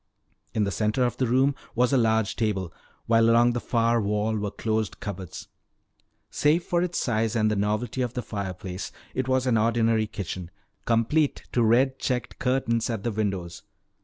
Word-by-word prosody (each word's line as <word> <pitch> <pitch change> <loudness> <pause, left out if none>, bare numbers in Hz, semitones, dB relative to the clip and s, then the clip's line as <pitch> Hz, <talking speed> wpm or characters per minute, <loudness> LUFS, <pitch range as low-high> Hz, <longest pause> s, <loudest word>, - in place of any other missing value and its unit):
In 110 - +2
the 100 - -1
center 110 +5 +1
of 120 0 -2
the 130 - +1
room 130 +4 +3 0.2
was 125 +3 +2
a - - +5
large 110 -2 +2
table, 95 -6 -1 0.3
while 115 0 +4
along 120 +1 +5
the 120 - -1
far 115 -1 +1
wall 105 +2 0
were 105 -1 -2
closed 110 0 -2
cupboards. 95 -4 -7 0.8
Save 155 +4 +2
for 175 -1 0
its 175 -1 -1
size 115 -1 0
and 110 -1 +2
the - - +1
novelty 105 +5 -1
of 125 -1 -2
the 125 - -2
fireplace, 95 -2 -5 0.2
it 130 0 -2
was 130 0 +1
an 120 -3 +3
ordinary 115 -1 +2
kitchen, 95 -4 -6 0.4
complete 120 +6 +1
to 120 - +1
red 130 +4 +3
checked 125 -2 -2
curtains 125 -3 0
at 110 -4 -3
the 120 - -1
windows. 95 -5 -3
115 Hz, 175 wpm, -26 LUFS, 105-125 Hz, 0.8 s, a